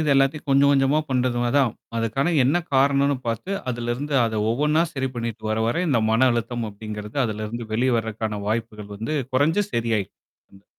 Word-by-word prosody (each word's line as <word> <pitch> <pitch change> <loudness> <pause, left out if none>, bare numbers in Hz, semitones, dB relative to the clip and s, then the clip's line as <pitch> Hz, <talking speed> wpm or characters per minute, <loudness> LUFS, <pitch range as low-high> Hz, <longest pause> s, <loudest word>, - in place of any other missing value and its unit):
இது 155 - 0
எல்லாத்தையும் 135 +2 +1
கொஞ்சம், 140 +1 +5
கொஞ்சமா 135 +2 +3
பண்றது 125 -1 +1
மா 120 - +1
தான். 130 -6 +3 0.2
அதுக்கான 135 +9 0
என்னா 150 +7 +2
காரணம்ன்னு 140 +1 +3
பாத்து, 115 - -3 0.2
அதிலிருந்து 120 +5 -3
அத 110 -2 -1
ஒவ்வொண்ணா 150 +6 +2
சரி 135 -1 -2
பண்ணிட்டு 115 -2 -4
வர, 110 - 0
வர 120 +10 0
இந்த 125 -5 +2
மன 125 +4 +4
அழுத்தம் 120 0 -2
அப்படிங்கிறது 105 +2 -8
அதுல 110 -1 -3
இருந்து 115 +1 -6
வெளிய 125 +2 +2
வரக்கான 110 -1 -3
வாய்ப்புகள் 105 -2 -3
வந்து 115 +9 -3 0.2
குறைஞ்சு, 160 +10 +3
சரியாயி 115 -4 0 0.5
இந்த 100 0 -19
120 Hz, 170 wpm, -23 LUFS, 110-140 Hz, 0.5 s, கொஞ்சம்